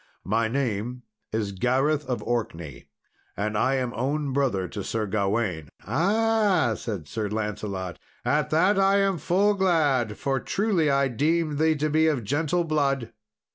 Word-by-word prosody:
"My 110 +3 +1
name 125 -1 -2 0.3
is 110 -2 -1
Gareth 135 +8 +1
of 120 -5 -2
Orkney, 95 -10 -4 0.5
and 105 +2 -2
I 130 +6 +2
am 125 -2 -1
own 140 +3 -1
brother 125 -10 0
to 100 -1 -6
Sir 110 +2 -2
Gawain." 100 -6 -1 0.2
"Ah!" 195 - +2
said 100 -11 -5
Sir 105 +3 -3
Lancelot, 100 -4 -4 0.3
"at 150 +1 +1
that 185 +6 +3
am 195 0 +3
I - - -5
full 195 +7 +2
glad; 150 - +1
for, 135 -1 -1
truly, 190 - +1
I 140 0 +3
deemed 150 +4 0
thee 160 0 +3
to 150 +1 0
be 160 +1 +3
of 140 -7 0
gentle 155 - 0
blood." 140 -7 0
135 Hz, 150 wpm, -25 LUFS, 110-160 Hz, 0.5 s, that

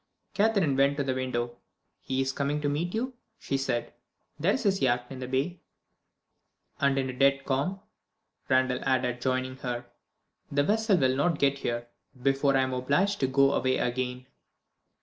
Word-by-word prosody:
Catherine 200 -9 +2
went 140 +1 +3
to 140 - +1
the 135 -1 0
window. 120 -2 -2 0.4
"He 130 0 -2
is 135 0 0
coming 140 +2 -1
to 145 - 0
meet 165 +7 -1
you," 255 +4 -2 0.2
she 135 - -3
said. 135 -3 -1 0.5
"There 175 +7 +3
is 265 - -2
his 195 -2 +1
yacht 120 -1 +2
in 130 - -7
the 125 - -5
bay." 140 +7 -1 1.2
"And 140 -1 +2
in 135 -1 0
a 130 - -4
dead 140 +1 +3
calm," 145 +9 -1 0.7
Randal 130 -1 +3
added, 125 -2 0
joining 130 0 -1
her. 120 -2 -4 0.7
"The 145 0 +2
vessel 215 +2 +2
will 130 -4 +2
not 155 +4 +1
get 140 -1 +2
here, 120 -2 -2 0.3
before 135 +1 +2
I - - +4
am 130 0 -2
obliged 145 +11 +1
to 130 - +2
go 135 +1 +4
away 130 0 +1
again." 125 +1 -2
135 Hz, 170 wpm, -28 LUFS, 130-145 Hz, 1.2 s, I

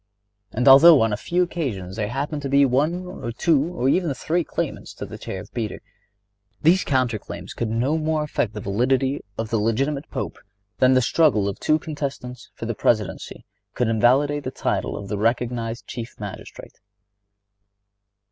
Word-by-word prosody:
And 125 +4 -1
although 140 +4 +9
on 115 -2 +1
a - - +2
few 175 +10 0
occasions 110 - -4
there 105 -2 -2
happened 145 +5 -3
to 140 - -4
be 140 0 +5 0.7
two 155 -4 +3
or 130 -8 -2
even 170 +3 +2
three 170 +6 0
claimants - - -4
for - - -7
the - - -9
chair 95 - -5
of 100 - -15
Peter, 110 -4 -3 0.8
these 175 +4 +4
counter 130 -5 0
claims 100 0 -8
could 115 - -3
no 125 +8 0
more 155 0 0
affect 120 -7 -2
the 105 - -5
validity 130 +7 0 0.2
of 115 0 -4
the 115 - +2
legitimate 135 +7 -1
Pope - - -5 0.4
than 130 0 +5
the 130 - +4
struggle 125 -8 +3
of 100 - -4
two 155 - +2
contestants 140 -5 -6
for - - -6
the 115 - -2
Presidency 110 -1 -1 0.3
could 125 -2 +1
invalidate 135 +6 +3
the 130 - -3
title - - -2
of 100 - -7
the 100 0 -3
recognized 115 0 -1
Chief 120 0 -8
Magistrate. 105 -2 -9
125 Hz, 165 wpm, -23 LUFS, 110-145 Hz, 0.8 s, although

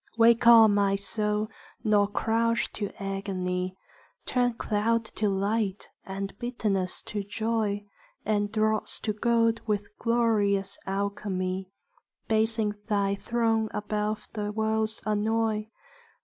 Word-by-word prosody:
Wake 230 0 +5
on, 225 -3 +9
my 200 -1 +3
soul, 210 +1 -1 0.4
nor 210 -2 +4
crouch 230 +2 0
to 205 -2 -3
agony: 185 -2 -3 0.5
Turn 245 -1 +1
cloud 225 +1 0
to 215 -1 -1
light, 200 +1 -1
and 195 0 -5
bitterness 210 -6 -2
to 210 -3 -4
joy, 210 0 -1 0.4
And 205 -1 +1
dross 215 -1 0
to 215 - -1
gold 230 +1 +2
with 210 0 -2
glorious 205 -4 +1
alchemy, 190 -1 -2 0.6
Basing 220 -1 +1
thy 200 -2 +1
throne 225 +1 0
above 210 0 -2
the 210 -1 -2
world's 220 0 -1
annoy. 215 0 0
210 Hz, 110 wpm, -28 LUFS, 200-225 Hz, 0.6 s, on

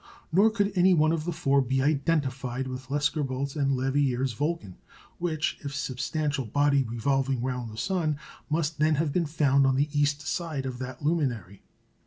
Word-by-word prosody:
Nor 200 +7 +5
could 205 -2 0
any 185 0 +5
one 155 0 +4
of 160 -2 -1
the 175 - -1
four 140 -4 +2
be 130 +1 0
identified 135 -4 0
with 130 0 -7
Lescarbault's 140 -2 -1
and 140 -2 +1
Leverrier's 130 -1 +1
Vulcan, 145 - -3 0.4
which, 160 -3 -1
if - - -16
a - - -2
substantial 140 +1 -2
body 145 +3 +3
revolving 130 +2 0
round 125 -2 -3
the 110 - -10
sun, 165 -3 0 0.3
must 155 -1 -1
then 155 0 +3
have 150 -1 0
been 170 -3 +1
found 140 -3 +3
on 135 - +2
the 145 +3 +1
east 145 0 +1
side 160 -6 -2
of 125 -2 -5
that 130 +2 -7
luminary. 130 - -1
140 Hz, 175 wpm, -27 LUFS, 130-155 Hz, 0.4 s, Nor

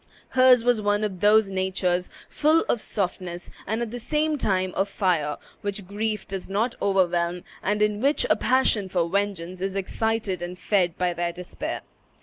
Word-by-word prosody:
Hers 255 -2 +6
was 240 -2 +2
one 205 0 +1
of 195 -4 -3
those 210 +1 +5
natures, 185 -1 0 0.2
full 310 +2 +3
of 235 - +1
softness 180 -2 -3 0.2
and 220 +4 -1
at 225 - -5
the 245 - -5
same 300 +5 0
time 185 -8 0
of 195 +1 0
fire, 170 -7 0 0.2
which 200 -1 -4
grief 210 +2 -2
does 195 -1 -5
not 220 +5 0
overwhelm, 180 -2 +1 0.2
and 210 +1 +1
in 210 0 0
which 280 +3 +2
a - - +4
passion 235 -6 +2
for 175 -2 +1
vengeance 185 -2 -2
is 195 0 -2
excited 210 0 -1
and 175 +1 -5
fed 180 -4 +1
by 180 -1 +1
their 170 0 -1
despair. 180 +1 -5
195 Hz, 170 wpm, -25 LUFS, 180-220 Hz, 0.2 s, Hers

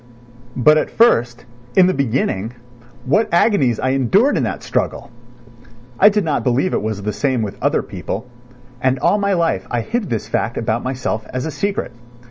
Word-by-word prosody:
But 150 +5 +5
at - - -2
first, 120 - +2 0.3
in 185 - +7
the 185 - +2
beginning, 115 -5 -1 0.5
what 210 - +1
agonies 150 - +2
I 130 - 0
endured 135 - +2
in - - +1
that - - -3
struggle! - - -2 0.9
I 205 - +8
did 210 -3 0
not 150 -3 0
believe 130 +8 +1
it - - 0
was 105 -2 -4
the 105 +1 -2
same 130 -5 0
with 100 -2 -6
other - - +1
people, 110 +6 -6 0.6
and 130 0 +2
all 205 +10 +2
my 200 -1 +1
life 170 -2 0
I 120 -1 -1
hid 220 - -3
this 115 -3 -3
fact 115 - -2
about 115 +1 -1
myself 125 -4 -3
as 130 0 -3
a 160 - -3
secret. 200 -5 -2
130 Hz, 180 wpm, -19 LUFS, 115-185 Hz, 0.9 s, I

